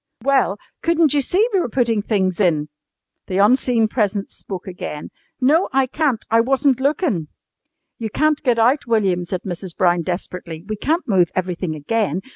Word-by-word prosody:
"Well, 265 -7 +2 0.2
couldn't 330 -3 +3
you 290 - +3
see 385 - +2
we 385 - +3
were 340 - -1
putting 230 -3 +1
things 190 -4 0
in?" 155 -6 +1 0.6
The 185 - -2
unseen 230 +2 +3
presence 205 -3 -1
spoke 190 -1 -7
again. 175 -5 -7 0.3
"No, 300 +8 +3
I 270 -1 +3
can't. 265 -3 -1
I 230 0 +5
wasn't 270 +1 +2
lookin'!" 270 - 0 0.7
"You 225 -2 -3
can't 305 +6 +1
get 245 -4 +1
out, 245 +5 +2
William," 195 -6 +1
said 180 +1 -4
Mrs. 180 -1 -6
Brown 175 -2 +3
desperately. 175 -1 -5
"We 215 - -2
can't 320 - -1
move 185 -6 +3
everything 180 -3 -2
again. 185 +2 -1
220 Hz, 165 wpm, -20 LUFS, 180-270 Hz, 0.7 s, I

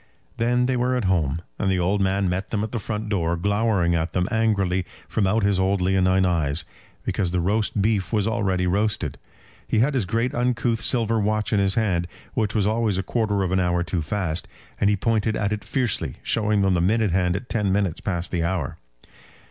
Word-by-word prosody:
Then 120 +2 +2
they 130 0 +1
were 125 +1 +1
at 125 -5 -1
home; 85 -3 +1 0.2
and 95 - +1
the 95 - +2
old 95 +3 +1
man 95 0 +1
met 90 +2 -2
them 105 -2 -1
at 110 - -4
the 120 - -2
front 110 +1 -4
door, 85 -5 0
glowering 100 -2 +1
at 80 0 -1
them 90 0 +1
angrily 100 -5 +1 0.2
from 100 - 0
out 110 +3 +1
his 100 -2 +2
old 95 +1 +2
leonine 95 0 +3
eyes, 80 -3 0 0.4
because 95 - 0
the 90 +1 0
roast 100 +3 0
beef 105 -4 0
was 105 -2 +1
already 95 -5 0
roasted. 105 +4 0 0.5
He - - 0
had 130 +7 +3
his 120 -9 0
great 115 +5 0
uncouth 120 -2 0
silver 115 -1 +1
watch 105 +1 0
in 105 - +3
his 95 -1 +2
hand, 90 -6 +1 0.3
which 110 -1 -1
was 105 -3 +2
always 110 -2 +1
a 95 - -1
quarter 105 -2 0
of 90 - -2
an 95 - +2
hour 90 -1 +1
too 85 0 -2
fast, 80 0 -2 0.3
and 100 - +3
he 105 - +2
pointed 110 +1 +1
at 105 0 0
it 105 -1 -4
fiercely, 120 +1 -1
showing 105 -2 +1
them 95 -1 +3
the 90 - +2
minute 105 +2 +2
hand 90 0 +1
at 120 +5 -5
ten 105 -5 0
minutes 95 -4 0
past 90 -3 -3
the 85 -2 0
hour. 85 -3 -2
100 Hz, 210 wpm, -24 LUFS, 90-110 Hz, 0.5 s, leonine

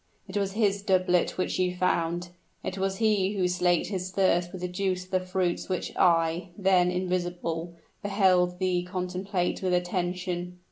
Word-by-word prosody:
"It 190 - -9
was 200 -1 0
his 200 -2 +1
doublet 185 -3 +2
which 185 - -1
you 180 -1 +1
found 175 -1 0 0.3
it 190 - -4
was 195 0 -1
he 210 -3 +2
who 190 -3 +1
slaked 180 -1 +1
his 185 -2 -3
thirst 180 -2 +2
with 185 - -8
the 180 - -1
juice 180 0 -2
of 185 - -24
the 185 - +3
fruits 185 -1 -2
which 185 - -3
I, 170 0 +2
then 185 -3 +4
invisible, 175 -2 -2 0.3
beheld 185 -3 +2
thee 185 -1 +1
contemplate 180 0 -2
with 185 -1 +1
attention." 180 0 -2
180 Hz, 160 wpm, -27 LUFS, 180-190 Hz, 0.3 s, then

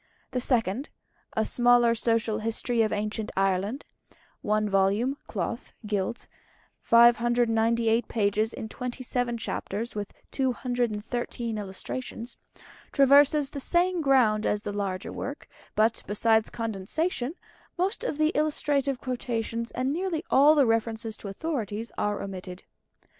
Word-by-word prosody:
The 250 - -1
Second 240 0 0 0.5
"A 220 - +3
Smaller 240 0 +4
Social 230 -1 +1
History 225 +2 -1
of 215 - +2
Ancient 210 +1 -2
Ireland" 195 +6 0 0.6
(1 215 0 +1
vol., 200 +6 +2
cloth, 215 +3 -4
gilt, 210 +2 -2 0.5
598 235 -1 +4
pages, 215 0 +1
in 220 - -6
27 245 0 -3
chapters, 225 0 -4
with 205 -1 -4 0.2
213 240 -3 -2
Illustrations) 225 +5 -6 0.6
traverses 285 +1 +5
the 285 - -5
same 350 +4 +1
ground 245 -7 +3
as 210 0 0
the 205 - -4
larger 195 -2 -3
work; 285 +2 -6 0.3
but, 220 +2 +2
besides 220 +2 +2
condensation, 240 - -2 0.4
most 375 +4 -1
of 410 -12 -2
the 310 0 +3
illustrative 285 -3 +1
quotations 235 -2 -3
and 260 +2 -1
nearly 345 -1 -2
all 290 +3 +7
the 285 -3 +5
references 225 -1 0
to - - -8
authorities 225 -1 -3
are 210 0 -1
omitted. 185 -2 -7
230 Hz, 120 wpm, -27 LUFS, 215-260 Hz, 0.6 s, all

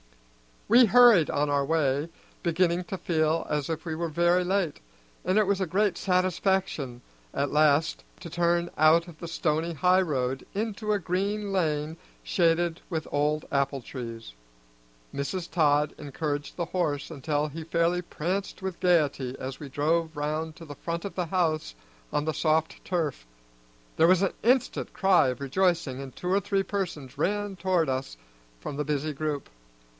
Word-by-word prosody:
We 240 +3 +7
hurried 230 - +6
on 145 +1 0
our 140 -1 +1
way, 145 0 +1 0.3
beginning 175 +1 +1
to 190 - -5
feel 160 -2 0
as 150 -1 -1
if 160 -1 -3
we 165 - -3
were 170 +2 -2
very 175 +3 +2
late, 185 -4 0 0.5
and 185 +3 +2
it 215 - +5
was 200 0 +1
a 190 - 0
great 195 +2 +1
satisfaction 185 -8 0 0.3
at 140 +1 -1
last 150 +1 +3 0.2
to 175 - -7
turn 170 +1 +1
out 160 +3 +5
of 165 -3 -13
the 170 - -6
stony 165 0 -1
highroad 145 -6 +1
into 215 0 -1
a - - +2
green 200 +3 -2
lane 155 -4 0 0.3
shaded 170 -1 +1
with 160 -3 -2
old 150 +1 0
apple 140 -1 0
trees. 115 - -8 0.8
Mrs. 165 +6 -3
Todd 150 -2 +3
encouraged 145 0 -4
the 170 - -2
horse 150 -5 -1
until 150 0 -1
he 160 +3 -7
fairly 170 +2 +1
pranced 180 +4 -3
with 190 -2 -4
gayety 150 -8 +2
as 130 0 -6
we 145 - -8
drove 160 +3 0
round 155 +2 -2
to 165 - -11
the 145 - -8
front 170 +4 -4
of 200 - -5
the 180 -2 -1
house 160 - 0 0.4
on 150 - 0
the 155 - 0
soft 160 0 0
turf. 155 - -2 0.7
There 165 - +6
was 185 0 +5
an 195 - +1
instant 250 +2 +1
cry 190 -7 +4
of 125 +1 -3
rejoicing, 145 -2 0
and 135 -2 -9
two 180 - -4
or 195 - +4
three 200 -1 0
persons 175 -10 -4
ran 205 0 0
toward 180 -3 +1
us 130 - -3 0.4
from 140 - -5
the 150 - -1
busy 150 +1 -1
group. 150 0 -3
165 Hz, 165 wpm, -27 LUFS, 145-180 Hz, 0.8 s, We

